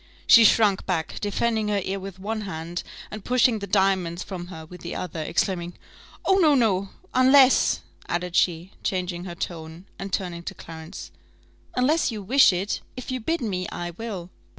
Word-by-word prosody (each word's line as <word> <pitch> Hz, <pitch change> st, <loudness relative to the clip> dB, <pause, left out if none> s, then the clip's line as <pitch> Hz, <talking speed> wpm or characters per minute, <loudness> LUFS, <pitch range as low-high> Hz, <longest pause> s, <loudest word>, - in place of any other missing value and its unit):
She 230 Hz, -, +8 dB
shrunk 205 Hz, -3 st, +4 dB
back, 170 Hz, -4 st, -2 dB
defending 220 Hz, +1 st, 0 dB
her 205 Hz, -1 st, +1 dB
ear 195 Hz, +1 st, -3 dB
with 190 Hz, 0 st, -8 dB
one 215 Hz, +3 st, -3 dB
hand, 170 Hz, -3 st, -5 dB, 0.3 s
and 215 Hz, -1 st, -7 dB
pushing 250 Hz, -2 st, +3 dB
the 200 Hz, -, -6 dB
diamonds 190 Hz, -3 st, +1 dB
from 180 Hz, -3 st, -7 dB
her 160 Hz, -3 st, -9 dB
with 180 Hz, +1 st, -12 dB
the 170 Hz, -, -6 dB
other, 175 Hz, -3 st, -4 dB
exclaiming, 175 Hz, +2 st, -1 dB, 0.5 s
"Oh, 385 Hz, 0 st, +4 dB
no, 310 Hz, -5 st, +5 dB
no! 200 Hz, -6 st, +2 dB, 0.2 s
unless," 260 Hz, +1 st, +5 dB, 0.3 s
added 175 Hz, 0 st, -2 dB
she, 175 Hz, +1 st, +1 dB
changing 180 Hz, -1 st, -2 dB
her 175 Hz, -2 st, -6 dB
tone, 165 Hz, +1 st, -6 dB
and 195 Hz, 0 st, -5 dB
turning 175 Hz, -3 st, -2 dB
to -, -, -7 dB
Clarence, 160 Hz, +2 st, -9 dB, 0.6 s
"unless 290 Hz, +7 st, +2 dB
you 215 Hz, -3 st, -6 dB
wish 265 Hz, +6 st, +6 dB
it: 190 Hz, +4 st, -2 dB, 0.2 s
if 255 Hz, -, -6 dB
you 255 Hz, -, -2 dB
bid 330 Hz, +9 st, -1 dB
me, 185 Hz, -6 st, -2 dB
I 175 Hz, 0 st, -4 dB
will." 185 Hz, -2 st, -6 dB
190 Hz, 175 wpm, -25 LUFS, 175-225 Hz, 0.6 s, She